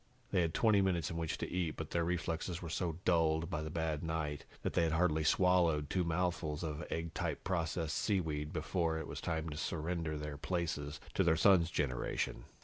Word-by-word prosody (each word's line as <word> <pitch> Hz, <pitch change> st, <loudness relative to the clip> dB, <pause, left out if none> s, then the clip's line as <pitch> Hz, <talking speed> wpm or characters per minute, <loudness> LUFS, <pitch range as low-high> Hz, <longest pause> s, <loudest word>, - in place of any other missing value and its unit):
They 95 Hz, -, +3 dB
had 80 Hz, -1 st, 0 dB
twenty 110 Hz, -3 st, +5 dB
minutes 90 Hz, -5 st, +1 dB
in 85 Hz, -, -4 dB
which 80 Hz, -1 st, -2 dB
to -, -, -3 dB
eat, 90 Hz, -4 st, -1 dB
but 80 Hz, -, -5 dB
their 85 Hz, -, +1 dB
reflexes 85 Hz, 0 st, -2 dB
were 85 Hz, -3 st, -6 dB
so 85 Hz, -1 st, -1 dB
dulled 80 Hz, -1 st, +2 dB
by 75 Hz, -, -1 dB
the 80 Hz, -, -4 dB
bad 80 Hz, -1 st, -1 dB
night 80 Hz, -3 st, -2 dB, 0.2 s
that -, -, -1 dB
they -, -, +3 dB
had 80 Hz, -1 st, +2 dB
hardly 80 Hz, -2 st, +2 dB
swallowed 85 Hz, -4 st, +3 dB
two 90 Hz, -, +2 dB
mouthfuls 85 Hz, -2 st, -1 dB
of 80 Hz, +1 st, -3 dB
egg 80 Hz, 0 st, -3 dB
type -, -, -2 dB
processed 85 Hz, -3 st, -1 dB
seaweed 80 Hz, -7 st, 0 dB
before 80 Hz, 0 st, 0 dB
it 80 Hz, -, -4 dB
was -, -, -6 dB
time 80 Hz, -1 st, -1 dB
to 75 Hz, -, -6 dB
surrender 80 Hz, -1 st, -2 dB
their 75 Hz, -1 st, -5 dB
places 75 Hz, -3 st, -2 dB
to 95 Hz, -, +3 dB
their 80 Hz, -2 st, +4 dB
son's 90 Hz, -3 st, +5 dB
generation. 65 Hz, -6 st, -1 dB
80 Hz, 200 wpm, -35 LUFS, 80-85 Hz, 0.2 s, twenty